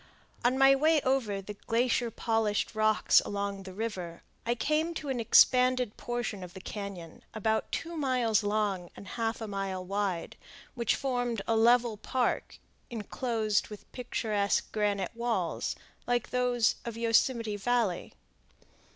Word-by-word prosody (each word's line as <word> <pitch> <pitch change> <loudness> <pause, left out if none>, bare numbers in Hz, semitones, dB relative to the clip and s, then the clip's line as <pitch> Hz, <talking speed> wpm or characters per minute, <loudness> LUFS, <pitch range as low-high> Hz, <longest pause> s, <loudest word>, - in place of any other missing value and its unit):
On 250 +2 +3
my 270 0 +7
way 310 +3 +4
over 230 -7 0
the 210 - -7
glacier 235 +3 0
polished 225 -2 0
rocks 215 0 +4
along 200 -1 -3
the 190 -1 -9
river, 185 -6 -5 0.2
I 240 - +2
came 310 +7 0
to 300 -3 -5
an 260 -2 -1
expanded 250 0 +4
portion 240 -5 -4
of 180 +1 -10
the - - -7
cañon, 190 -4 -7
about 220 0 0
two 335 +1 -3
miles 250 -7 +2
long 205 -4 -1
and 200 - -10
half 230 0 -2
a 220 - -4
mile 195 -2 -3
wide, 195 -2 -2 0.4
which 235 -4 +1
formed 245 -5 -1
a 225 - +2
level 235 0 +4
park 250 +3 -1 0.3
inclosed 225 -2 -1
with 210 -1 -12
picturesque 215 -5 -1
granite 205 -3 0
walls 230 -8 -1 0.3
like 245 -1 0
those 245 -2 +2
of 230 -1 -6
Yosemite 230 -1 +2
Valley. 225 -4 0
225 Hz, 140 wpm, -30 LUFS, 200-245 Hz, 0.4 s, my